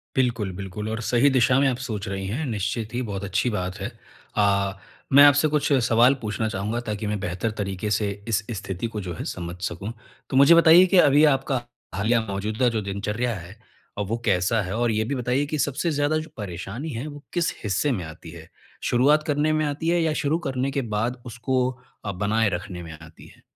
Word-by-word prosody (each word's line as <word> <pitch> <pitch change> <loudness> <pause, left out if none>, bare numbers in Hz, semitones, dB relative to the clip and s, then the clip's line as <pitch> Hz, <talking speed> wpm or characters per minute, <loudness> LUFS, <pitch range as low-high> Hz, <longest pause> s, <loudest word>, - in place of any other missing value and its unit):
बिल्कुल, 115 -7 +1
बिल्कुल 100 +3 -5
और 110 +1 -3
सही 125 +4 +3
दिशा 130 0 +3
में 140 - +4
आप 125 - -2
सोच 110 -7 -5
रही 95 0 -4
हैं। 140 +10 -2
निश्चित 110 0 -3
ही 125 - -1
बहुत 100 -4 -4
अच्छी 100 +5 0
बात 95 -2 -3
है। 100 +5 -3 0.5
अ, 100 -1 +2 0.4
मैं 140 +1 +9
आपसे 145 +2 +5
कुछ 150 0 0 0.2
सवाल 120 +3 +5
पूछना 110 +1 -2
चाहूँगा 105 +4 -2
ताकि 105 0 -3
मैं 105 -1 -2
बेहतर 95 +3 -2
तरीक़े 100 +1 -3
से 105 0 +1 0.2
इस 110 -1 +1
स्थिति 95 +2 -4
को 105 - -2
जो 90 -2 -5
है - - -6
समझ 85 -1 -5
सकूँ। 100 +7 -6 0.4
तो 130 - 0
मुझे 140 +5 +8
बताइए 170 +2 +8
कि 185 0 +2
अभी 145 0 +6
आपका 135 -2 -2 0.3
हालिया 115 +4 +2
मौजूदा 110 +5 0
जो 110 -2 -1
दिनचर्या 105 +4 -2
है। 90 +2 -9 0.4
अ, - - -1
वो 110 +4 -2
कैसा 100 +3 +2
है? 95 +3 -4
और 120 -1 +1
ये 110 0 +1
भी 140 +5 -2
बताइए 125 +3 0
कि 155 +1 -3
सबसे 145 +5 0
ज़्यादा 145 +1 +1
जो 155 +1 -5
परेशानी 105 - -5
है। 130 +3 -5
वो 145 0 -9
किस 175 -2 +1
हिस्से 105 +8 +1
में 95 -8 -2
आती 80 +1 -10
है? 80 -2 -12 0.3
शुरुआत 145 +5 +3
करने 150 +1 +1
में 155 0 +1
आती 150 +3 -2
है 175 0 +2
या 160 -1 +1
शुरू 150 +3 +2
करने 130 +1 -1
के 140 - -1
बाद 120 +3 -1
उसको 125 +2 -1 0.4
अ, 100 - -1
बनाए 105 +3 +1
रखने 90 0 -5
में 80 -1 -8
आती 80 +1 -14
है। - - -19
115 Hz, 210 wpm, -24 LUFS, 100-135 Hz, 0.5 s, मैं